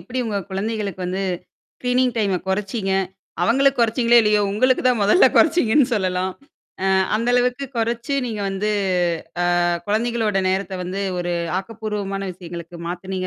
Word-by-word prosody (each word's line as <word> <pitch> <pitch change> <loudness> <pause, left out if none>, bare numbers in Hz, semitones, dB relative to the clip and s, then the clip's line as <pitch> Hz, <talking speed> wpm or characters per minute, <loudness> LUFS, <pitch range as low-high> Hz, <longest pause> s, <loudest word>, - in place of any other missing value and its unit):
எப்பிடி 255 +1 -6
உங்க 210 -3 -2
குழந்தைகளுக்கு 200 -1 -3
வந்து 190 +2 -2 0.5
ஸ்கிரீனிங் 250 0 +1
டைம 200 -4 +1
குறைச்சீங்க. 195 +1 -1 0.5
அவுங்களுக்கு 270 +3 +3
குறைச்சீங்களே 235 +1 +4
இல்லையோ! 210 -1 +3
உங்களுக்கு 255 +5 +2
தான் 250 -3 +3
மொதல்ல 210 - +6
குறைச்சீங்கன்னு 295 -5 +4
சொல்லலாம். 185 -2 -1 0.5
அ - - +2 0.3
அந்த 230 +3 0
அளவுக்கு 250 +2 +1
கொறைச்சு 235 +4 -1
நீங்க 220 -3 -4
வந்து 195 +2 -1 0.9
அ - - +2 0.2
குழந்தைகளோட 220 -1 0
நேரத்த 190 +1 -1
வந்து 185 +2 -4 0.2
ஒரு 175 0 -2 0.3
ஆக்கப்பூர்வமான 200 -2 -4
விஷயங்களுக்கு 170 -1 -9
மாத்துனீங்க 185 +1 -4
210 Hz, 130 wpm, -21 LUFS, 190-235 Hz, 0.9 s, மொதல்ல